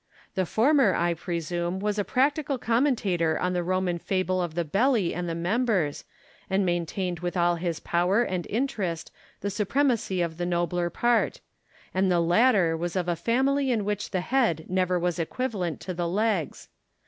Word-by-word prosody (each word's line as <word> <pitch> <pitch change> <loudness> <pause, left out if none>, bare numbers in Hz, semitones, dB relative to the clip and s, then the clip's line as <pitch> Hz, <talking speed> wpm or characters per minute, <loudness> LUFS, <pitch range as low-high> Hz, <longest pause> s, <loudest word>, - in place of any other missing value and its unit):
The 185 -2 -1
former, 250 - +3
I 170 0 +1
presume, 175 +1 -3
was 210 +1 -1
a - - +2
practical 275 +3 +1
commentator 230 - +1
on 180 0 -1
the 180 - 0
Roman 180 0 -1
fable 185 0 0
of 170 -3 -4
the 170 -1 0
belly 205 - +2
and 175 0 -3
the 165 - -2
members, 185 - 0 0.4
and 190 0 +2
maintained 175 0 -2
with 175 +1 -3
all 175 0 +2
his 170 -1 -2
power 180 +6 +2
and 185 -6 -3
interest 200 -9 -2 0.3
the 200 - -2
supremacy 215 -1 0
of 160 -1 -4
the 175 - -2
nobler 175 0 0
part; 240 +6 +1 0.5
and 190 0 +2
the 175 - +3
latter 175 0 +3
was 170 +2 -3
of 180 -2 -1
a 175 - +1
family 265 - +1
in 225 -5 0
which 205 0 -2
the 185 - -1
head 225 - +1
never 185 -1 +1
was 175 0 -1
equivalent 185 -2 -2
to 185 - -4
the 175 0 -2
legs. 195 -3 -1
185 Hz, 170 wpm, -26 LUFS, 175-220 Hz, 0.5 s, former